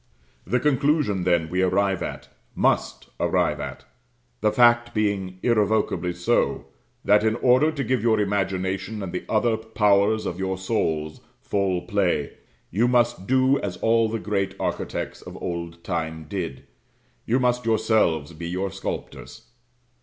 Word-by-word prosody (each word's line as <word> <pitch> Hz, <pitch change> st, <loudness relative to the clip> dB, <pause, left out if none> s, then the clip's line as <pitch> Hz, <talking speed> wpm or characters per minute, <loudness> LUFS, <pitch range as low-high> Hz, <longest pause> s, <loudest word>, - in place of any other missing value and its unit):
This 125 Hz, 0 st, 0 dB
conclusion, 140 Hz, -, +1 dB
then, 85 Hz, -3 st, +2 dB
we 90 Hz, +3 st, -1 dB
arrive 95 Hz, 0 st, +1 dB
at, -, -, -5 dB, 0.3 s
must -, -, 0 dB
arrive -, -, +1 dB
at; -, -, -7 dB, 0.5 s
the 105 Hz, -2 st, +2 dB
fact 120 Hz, 0 st, +4 dB
being 100 Hz, -3 st, -1 dB
irrevocably 105 Hz, -6 st, +1 dB
so: 90 Hz, 0 st, 0 dB, 0.4 s
that 105 Hz, +1 st, +5 dB
in 110 Hz, 0 st, +2 dB
order 130 Hz, +6 st, +4 dB
to 140 Hz, -3 st, -3 dB
give 130 Hz, -1 st, 0 dB
your 110 Hz, -1 st, +2 dB
imagination 95 Hz, 0 st, -1 dB
and 90 Hz, -, -6 dB
the 90 Hz, -, -3 dB
other 110 Hz, +1 st, +2 dB
powers 110 Hz, -1 st, +2 dB
of 90 Hz, 0 st, -4 dB
your 95 Hz, 0 st, -2 dB
souls 80 Hz, -6 st, -2 dB, 0.2 s
full 95 Hz, -3 st, -1 dB
play, 90 Hz, -8 st, 0 dB, 0.4 s
you 110 Hz, +7 st, +2 dB
must 120 Hz, -5 st, +1 dB
do 130 Hz, +2 st, +3 dB
as 95 Hz, -3 st, -4 dB
all 115 Hz, +2 st, +2 dB
the 115 Hz, -, -2 dB
great 100 Hz, -1 st, -2 dB
architects -, -, -3 dB
of -, -, -10 dB
old 85 Hz, -1 st, -5 dB
time 80 Hz, -3 st, -3 dB
did 90 Hz, -1 st, -5 dB, 0.6 s
you 125 Hz, +3 st, +2 dB
must 125 Hz, -1 st, +1 dB
yourselves 90 Hz, -9 st, +1 dB
be 85 Hz, +2 st, -6 dB
your 95 Hz, +2 st, -2 dB
sculptors. -, -, -7 dB
100 Hz, 145 wpm, -24 LUFS, 90-115 Hz, 0.6 s, that